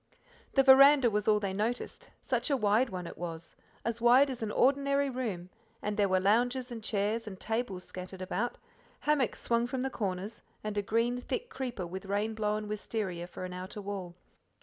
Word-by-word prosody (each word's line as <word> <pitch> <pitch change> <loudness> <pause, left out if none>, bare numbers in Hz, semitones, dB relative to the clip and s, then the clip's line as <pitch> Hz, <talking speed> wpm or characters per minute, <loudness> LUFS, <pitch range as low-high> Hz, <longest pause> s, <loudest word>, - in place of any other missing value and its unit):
The 270 - +5
veranda 270 -1 +8
was 210 0 0
all 210 -1 +5
they 200 -2 -2
noticed; 220 +5 -3
such 245 0 -1
a 280 - +3
wide 220 +3 +3
one 180 -2 -5
it - - -9
was, 165 -1 -5 0.3
as 230 0 -2
wide 255 +4 +6
as 250 - -6
an 220 - -2
ordinary 280 +3 +2
room, 200 -9 -4 0.3
and 210 0 -2
there 205 -2 +2
were 185 0 +3
lounges 245 +6 +2
and 225 -2 -6
chairs 215 +2 -1
and 190 -3 -7
tables 220 -5 -2
scattered 185 +1 -8
about, 210 +6 -2 0.4
hammocks 295 -5 +1
swung 235 0 +2
from 255 0 -3
the 265 - -2
corners, 200 0 -3 0.2
and 215 -1 -3
a 205 - +1
green 230 +4 0
thick 485 - -4
creeper 250 - -4
with 185 +3 -7
rain 205 +3 0
blown 210 -1 -1
wisteria 205 -4 -3
for 180 +1 -7
an 180 - -6
outer 185 +3 -6
wall. 195 -3 -5
215 Hz, 190 wpm, -31 LUFS, 195-245 Hz, 0.4 s, veranda